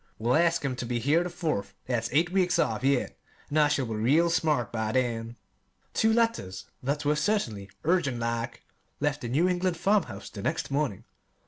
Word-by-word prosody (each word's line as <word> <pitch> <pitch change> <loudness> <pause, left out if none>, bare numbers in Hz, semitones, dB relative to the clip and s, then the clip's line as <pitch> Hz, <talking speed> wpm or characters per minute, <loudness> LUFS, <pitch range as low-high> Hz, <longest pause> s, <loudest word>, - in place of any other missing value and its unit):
"We'll 120 +3 +1
ask 165 -2 +2
'em 130 -2 -1
ter 125 -1 -5
be 120 0 -1
here 145 +8 +2
the 180 - -4
Fourth; 160 - -3
that's 115 -3 -1
eight 165 +6 +2
weeks 185 -2 +2
off 110 +2 0
yet, 135 -1 +1 0.3
an' 150 - 0
I 150 - +6
shall 145 -3 0
be 115 - -4
real 145 +11 +3
smart 155 -8 +1
by 110 -1 -2
then." 115 -2 -1 0.6
Two 220 - +3
letters 220 - 0 0.2
that 145 +3 -2
were 150 +1 +3
certainly 150 - -1
"urgent 160 -6 +1
like" 115 0 -3 0.4
left 145 0 0
the 120 - -4
New 150 +9 +2
England 180 -1 0
farmhouse 185 - 0
the 100 - -7
next 155 +4 -2
morning. 140 -9 -1
140 Hz, 190 wpm, -28 LUFS, 115-170 Hz, 0.6 s, I